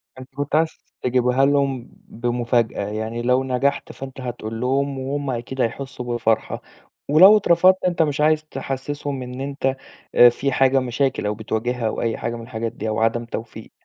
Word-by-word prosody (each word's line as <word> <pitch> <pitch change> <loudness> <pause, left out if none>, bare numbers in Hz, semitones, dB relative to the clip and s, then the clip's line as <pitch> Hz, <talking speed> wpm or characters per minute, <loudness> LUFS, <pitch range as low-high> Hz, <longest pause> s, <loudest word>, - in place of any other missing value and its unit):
فأنت 130 +1 -13
كنت 145 +1 -2
عايز 160 +1 +3 0.3
تجيبها 125 +1 +2
لهم 140 -3 0 0.2
بمفاجأة، 120 -3 -1
يعني 110 +2 -4
لو 125 +2 +2
نجَحت 135 +2 -1
فأنت 135 0 -9
هتقول 115 -3 -5
لهم 135 +2 0
وهُم 140 +1 -3
أكيد 125 +2 -4
هيحسّوا 130 +2 -3
بالفرحة 115 -2 -1 0.5
ولو 185 +8 +8
اترفضت 185 -1 +4
أنت 175 -2 0
مش 150 -2 +1
عايز 155 0 +3
تحسّسهم 140 -1 -4
إن 125 +1 -7
أنت 135 -1 -1 0.4
آآ 120 - +9
في 135 +3 -2
حاجة 135 +1 +3
مشاكل 130 -1 -1
أو 105 - 0
بتواجهها 115 +2 -2
أو - - -3
أي 115 -1 -1
حاجة 115 - -3
من 115 - -7
الحاجات 115 -1 -4
دي 110 - -5
أو 110 - -1
عدم 115 +1 +1
توفيق. 110 -1 -8
130 Hz, 170 wpm, -22 LUFS, 115-140 Hz, 0.5 s, آآ